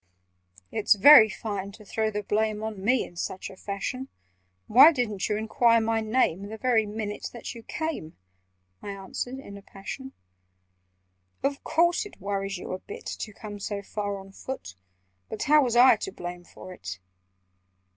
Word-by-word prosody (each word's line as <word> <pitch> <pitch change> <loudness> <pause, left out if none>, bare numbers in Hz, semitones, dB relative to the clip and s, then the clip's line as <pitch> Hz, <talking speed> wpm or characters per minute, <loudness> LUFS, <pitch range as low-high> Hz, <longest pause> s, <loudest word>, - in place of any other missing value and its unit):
"It's 215 -1 +3
very 220 +1 +9
fine 200 -1 -5
to 215 0 -14
throw 220 +2 -1
the 210 -1 -3
blame 215 +1 0
On 215 -3 -5
me 245 +4 +3
in 175 - -15
such 185 +3 -5
a - - -12
fashion! 210 +8 -5 0.6
Why 270 +8 +8
didn't 225 - -2
you 210 - +1
enquire 230 +2 +3
my 225 0 0
name 215 -4 +1
The 220 - -6
very 225 -2 +2
minute 210 0 -4
that 235 - -7
you 235 - -10
came?" 310 - -5 0.6
I - - -7
answered 200 +6 -5
in 200 -7 -10
a - - -11
passion. 235 +8 -8 1.3
"Of 280 0 -1
course 340 +2 +2
it - - -18
worries 195 0 -3
you - - -7
a 185 - -3
bit 435 - -10
To 215 - -5
come 205 0 -9
so 200 0 -4
far 205 0 -3
on 195 0 -11
foot— 195 - -7 0.6
But 215 - -4
how 300 0 +5
was 240 -2 0
I 245 -1 +7
to 195 - -5
blame 175 -1 -7
for 185 +1 -11
it?" 95 - -7
215 Hz, 170 wpm, -27 LUFS, 195-245 Hz, 1.3 s, very